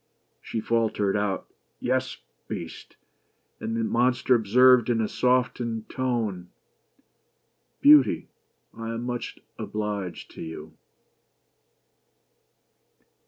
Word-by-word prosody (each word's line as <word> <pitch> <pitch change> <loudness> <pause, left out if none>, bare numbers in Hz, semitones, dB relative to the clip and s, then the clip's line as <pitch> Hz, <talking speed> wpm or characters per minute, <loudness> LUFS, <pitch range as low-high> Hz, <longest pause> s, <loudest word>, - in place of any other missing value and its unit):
She 115 - -4
faltered 110 -4 0
out 100 -2 -1 0.2
— - - -47
"Yes, 130 0 0 0.3
Beast," - - -7 0.6
and 115 +1 -3
the 115 - 0
monster 125 +3 +2
observed 125 +2 +5
in 120 -2 +2
a 110 - +1
softened 125 -3 0
tone 110 -9 -2 0.4
— - - -42
" - - -47
Beauty, 145 -2 +6 0.5
I 115 0 -5
am 115 - -4
much 120 -1 -4 0.2
obliged 105 -4 -4
to - - -10
you." 80 -1 -8
115 Hz, 105 wpm, -26 LUFS, 105-125 Hz, 0.6 s, Beauty